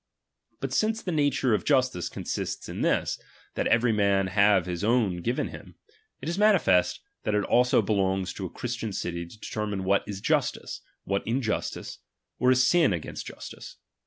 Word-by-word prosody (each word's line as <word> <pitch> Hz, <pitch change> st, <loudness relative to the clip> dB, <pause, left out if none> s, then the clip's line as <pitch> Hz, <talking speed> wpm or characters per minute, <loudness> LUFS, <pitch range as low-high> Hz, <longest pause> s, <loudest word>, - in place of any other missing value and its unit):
But -, -, -3 dB
since 220 Hz, +1 st, +1 dB
the 180 Hz, -, -2 dB
nature 145 Hz, -5 st, +2 dB
of 105 Hz, -, +1 dB
justice 130 Hz, -, +1 dB
consists -, -, -4 dB
in -, -, -5 dB
this, -, -, +1 dB, 0.3 s
that -, -, -1 dB
every 115 Hz, 0 st, +3 dB
man 100 Hz, -2 st, +2 dB
have 100 Hz, -2 st, +4 dB
his 90 Hz, 0 st, -4 dB
own 110 Hz, -5 st, +2 dB
given 120 Hz, +9 st, -1 dB
him; -, -, -11 dB, 0.5 s
it -, -, -6 dB
is 170 Hz, +4 st, -2 dB
manifest, 195 Hz, -, +3 dB, 0.2 s
that 105 Hz, -, -1 dB
it 105 Hz, -, +2 dB
also 125 Hz, 0 st, +3 dB
belongs 95 Hz, -2 st, 0 dB
to 95 Hz, -, -5 dB
a -, -, -14 dB
Christian 120 Hz, -3 st, -4 dB
city 85 Hz, -2 st, -3 dB
to 105 Hz, -, -15 dB
deter 105 Hz, 0 st, -4 dB
mine 100 Hz, -2 st, -3 dB
what 100 Hz, +1 st, +3 dB
is 100 Hz, -2 st, -5 dB
justice, -, -, -1 dB, 0.2 s
what 100 Hz, 0 st, -1 dB
injustice, 115 Hz, -2 st, -2 dB, 0.4 s
or 125 Hz, -, +3 dB
a 130 Hz, -, +6 dB
sin 135 Hz, -, +4 dB
against 85 Hz, -3 st, -5 dB
justice. -, -, -9 dB
105 Hz, 175 wpm, -27 LUFS, 95-125 Hz, 0.5 s, a